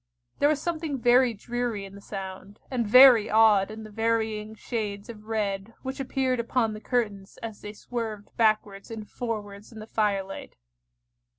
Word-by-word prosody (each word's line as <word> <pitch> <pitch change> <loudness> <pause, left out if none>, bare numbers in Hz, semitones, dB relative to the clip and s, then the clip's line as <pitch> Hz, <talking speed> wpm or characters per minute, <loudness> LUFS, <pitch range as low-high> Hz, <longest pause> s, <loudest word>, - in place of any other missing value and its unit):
There 290 - +4
was 305 -2 +1
something 320 -3 -2
very 245 +1 +4
dreary 235 -1 -3
in 195 - -11
the 200 - -11
sound, 195 0 -8
and 240 -4 0
very 250 -1 +8
odd 215 -3 +5
in 220 0 -8
the 215 - -10
varying 220 -1 -1
shades 210 -3 -4
of 215 -2 -10
red 210 -1 -2
which 265 +1 -5
appeared 260 -1 0
upon 235 -1 0
the 215 - -8
curtains 210 -6 -2
as 220 -2 -6
they 210 - -7
swerved 220 -2 -6
backwards 215 -3 +1
and 220 -2 -7
forwards 210 -3 -5
in 225 - -12
the 215 - -8
firelight. 200 -3 -2
220 Hz, 165 wpm, -27 LUFS, 205-240 Hz, -, very